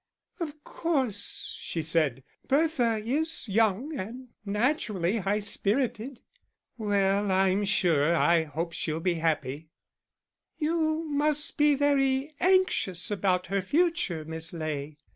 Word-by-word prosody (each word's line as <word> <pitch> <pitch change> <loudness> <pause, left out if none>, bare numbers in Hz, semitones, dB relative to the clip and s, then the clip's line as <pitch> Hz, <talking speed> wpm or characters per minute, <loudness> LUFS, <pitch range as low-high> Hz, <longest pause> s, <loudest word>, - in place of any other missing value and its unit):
"Of 305 -3 -6
course," 260 - -2
she 165 - -3
said, 150 -5 +1 0.2
"Bertha 270 -6 +2
is 300 +3 0
young, 220 +7 +1
and 245 +4 -7
naturally 210 - 0
high 200 0 0
spirited." 225 +4 -1 0.5
"Well, 200 -2 +1
I'm 190 +1 +2
sure, 170 -6 +2
I 170 -1 +3
hope 165 +3 -4
she'll 160 0 -2
be 180 +1 +1
happy." 155 -1 -2 0.9
"You 315 0 0
must 300 0 +2
be 295 -1 +4
very 275 0 +1
anxious 365 - +2
about 190 -3 +1
her 200 - +2
future, 295 - 0
Miss 160 +1 -4
Ley." 155 -2 -4
210 Hz, 115 wpm, -28 LUFS, 170-285 Hz, 0.9 s, be